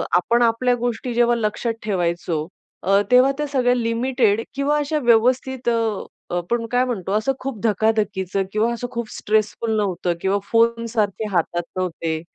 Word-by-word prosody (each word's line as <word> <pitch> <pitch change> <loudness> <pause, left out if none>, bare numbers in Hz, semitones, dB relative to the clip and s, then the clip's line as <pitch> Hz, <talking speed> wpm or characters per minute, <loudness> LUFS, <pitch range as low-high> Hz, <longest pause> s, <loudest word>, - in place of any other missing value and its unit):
आपण 235 +7 +2
आपल्या 240 +2 +2
गोष्टी 245 0 -3
जेव्हा 240 0 +3
लक्षात 230 +1 -1
ठेवायचो, 170 -5 -1 0.4
अ, 195 +2 +4
तेव्हा 250 +2 +6
त्या 295 0 -2
सगळ्या 255 -3 +2
लिमिटेड 230 -2 +1
किंवा 280 +2 +1
अशा 295 +1 0
व्यवस्थित 250 +1 +2
अ, 225 -3 0 0.3
आपण 230 +7 -1
काय 250 0 +3
म्हणतो? 200 -7 -3
असं 215 +6 +1
खूप 265 -4 -5
धकाधकीचं 205 -3 +1
किंवा 215 +3 +1
असं 245 +1 -4
खूप 235 -2 -4
स्ट्रेसफुल 215 +1 0
नव्हतं 185 -4 0
किंवा 195 +1 +1
फोन 230 0 +3
सारखे 215 -1 -1
हातात 175 -1 0
नव्हते, 165 -3 -2
230 Hz, 150 wpm, -21 LUFS, 200-245 Hz, 0.4 s, तेव्हा